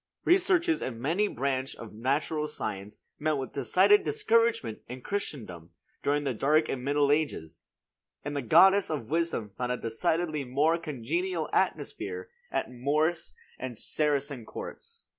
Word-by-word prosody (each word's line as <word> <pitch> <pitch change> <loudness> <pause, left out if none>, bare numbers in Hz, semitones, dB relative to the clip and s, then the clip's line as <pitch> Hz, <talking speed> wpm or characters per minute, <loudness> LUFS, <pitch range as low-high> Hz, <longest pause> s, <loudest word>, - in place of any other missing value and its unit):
Researches 355 -2 +3
in 120 0 -4
any 185 +8 +2
branch 135 -3 -2
of 115 -2 -10
natural 145 +6 0
science 105 -7 -6 0.2
met 155 +1 +1
with 135 -1 -5
decided 185 - +4
discouragement 230 - +1
in 125 +1 -7
Christendom 110 - -5 0.3
during 145 +1 +1
the 135 -2 -1
dark 150 +7 +3
and 125 -2 -3
middle 145 +1 +2
ages; 85 - -1 0.6
and 145 0 -3
the 140 - 0
goddess 190 - +6
of 140 -6 -4
wisdom 165 -11 -1
found 125 0 -1
a - - -2
decidedly 155 +7 -1
more 145 +6 +2
congenial 165 - -2
atmosphere 450 +1 -1 0.2
at - - -2
Moorish 150 +7 0 0.3
and 125 -3 -5
Saracen 140 -3 -1
courts. - - -9
145 Hz, 140 wpm, -29 LUFS, 125-170 Hz, 0.6 s, goddess